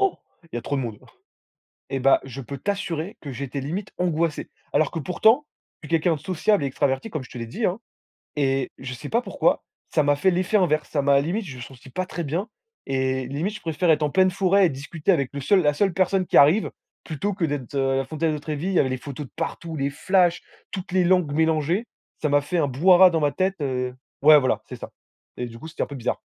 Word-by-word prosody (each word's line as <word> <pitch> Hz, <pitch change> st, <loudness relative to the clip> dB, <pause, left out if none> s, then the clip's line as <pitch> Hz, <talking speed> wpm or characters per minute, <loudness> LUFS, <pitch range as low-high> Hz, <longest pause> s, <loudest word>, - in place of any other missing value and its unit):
il 350 Hz, -, -3 dB
y -, -, -1 dB
a 120 Hz, -, -4 dB
trop 140 Hz, -, -2 dB
de -, -, 0 dB
monde. 110 Hz, -3 st, -5 dB, 0.9 s
Et 135 Hz, -, -1 dB
bah, 135 Hz, +1 st, +5 dB
je 135 Hz, 0 st, -7 dB
peux 140 Hz, +2 st, -7 dB
t'assurer 185 Hz, 0 st, -3 dB
que 140 Hz, -, -7 dB
j'étais 135 Hz, +2 st, -4 dB
limite 175 Hz, +9 st, -4 dB
angoissé. 170 Hz, -3 st, -1 dB, 0.2 s
Alors 155 Hz, -, +2 dB
que 165 Hz, -, -3 dB
pourtant, 220 Hz, -, +3 dB, 0.4 s
je 155 Hz, -, -9 dB
suis -, -, -17 dB
quelqu'un 165 Hz, +1 st, +2 dB
de -, -, -12 dB
sociable 190 Hz, +2 st, +1 dB
et -, -, +1 dB
extraverti 135 Hz, -, -1 dB
comme 150 Hz, -5 st, -4 dB
je -, -, -15 dB
te -, -, -8 dB
l'ai 115 Hz, -, -5 dB
dit, 220 Hz, -, -4 dB
hein, 185 Hz, +5 st, -2 dB, 0.6 s
et 135 Hz, -2 st, 0 dB
je 125 Hz, -1 st, -6 dB
sais 145 Hz, +4 st, -8 dB
pas 235 Hz, -, +2 dB
pourquoi -, -, +1 dB, 0.3 s
ça 155 Hz, -, +3 dB
m'a 145 Hz, 0 st, +4 dB
fait 170 Hz, +7 st, +3 dB
l'effet 185 Hz, +4 st, +1 dB
inverse. 155 Hz, -6 st, +2 dB
Ça 145 Hz, -, 0 dB
m'a 140 Hz, 0 st, +4 dB
limite, 185 Hz, +9 st, -2 dB
je 135 Hz, -5 st, -8 dB
me 125 Hz, -, -8 dB
senti 130 Hz, +2 st, -12 dB
pas 185 Hz, +7 st, -3 dB
très 175 Hz, -, -5 dB
bien 170 Hz, -, -2 dB, 0.4 s
et 130 Hz, -1 st, -1 dB
limite 155 Hz, +11 st, -3 dB
je -, -, -11 dB
préfère 165 Hz, +1 st, 0 dB
être 155 Hz, -1 st, +3 dB
en 150 Hz, -, 0 dB
pleine 185 Hz, +2 st, +4 dB
forêt 195 Hz, +1 st, +3 dB
et -, -, +3 dB
discuter 150 Hz, +6 st, -2 dB
avec 140 Hz, -7 st, 0 dB
le 140 Hz, -, -3 dB
seul 195 Hz, +6 st, +4 dB
la 150 Hz, -3 st, +2 dB
seule 195 Hz, +2 st, +1 dB
personne 185 Hz, +1 st, +1 dB
qui -, -, 0 dB
arrive 155 Hz, +10 st, +5 dB, 0.3 s
plutôt 180 Hz, +6 st, -3 dB
que 180 Hz, -, -2 dB
d'être, 145 Hz, -5 st, -3 dB
heu, 135 Hz, -1 st, +1 dB
à -, -, +1 dB
la 135 Hz, -, 0 dB
frontière 155 Hz, +4 st, -1 dB
de 150 Hz, -, -3 dB
Trevi. 150 Hz, +3 st, -4 dB
Il -, -, -1 dB
y -, -, +4 dB
avait 130 Hz, -, +3 dB
les 130 Hz, -, -2 dB
photos 140 Hz, +2 st, -7 dB
de -, -, -22 dB
partout, 165 Hz, 0 st, -4 dB
les 140 Hz, -1 st, -1 dB
flashs, 175 Hz, +3 st, +2 dB, 0.3 s
toutes 185 Hz, -2 st, -6 dB
les 185 Hz, 0 st, +3 dB
langues 175 Hz, -4 st, +3 dB
mélangées, 160 Hz, +6 st, +1 dB, 0.4 s
ça 155 Hz, -, +2 dB
m'a 145 Hz, 0 st, +4 dB
fait 175 Hz, +5 st, -2 dB
un 150 Hz, -3 st, +2 dB
brouhaha 180 Hz, +8 st, +6 dB
dans 165 Hz, -2 st, 0 dB
ma 145 Hz, -1 st, +1 dB
tête, 190 Hz, +3 st, 0 dB
heu 125 Hz, -2 st, -2 dB, 0.3 s
ouais 150 Hz, +1 st, +9 dB
voilà, 130 Hz, -2 st, 0 dB
c'est -, -, -7 dB
ça. -, -, -9 dB, 0.5 s
Et 125 Hz, -, -2 dB
du 115 Hz, -1 st, -10 dB
coup, 160 Hz, -, -9 dB
c'était 160 Hz, -, -4 dB
un -, -, 0 dB
peu 145 Hz, -, -9 dB
bizarre. 125 Hz, -4 st, -2 dB
155 Hz, 250 wpm, -24 LUFS, 135-180 Hz, 0.9 s, ouais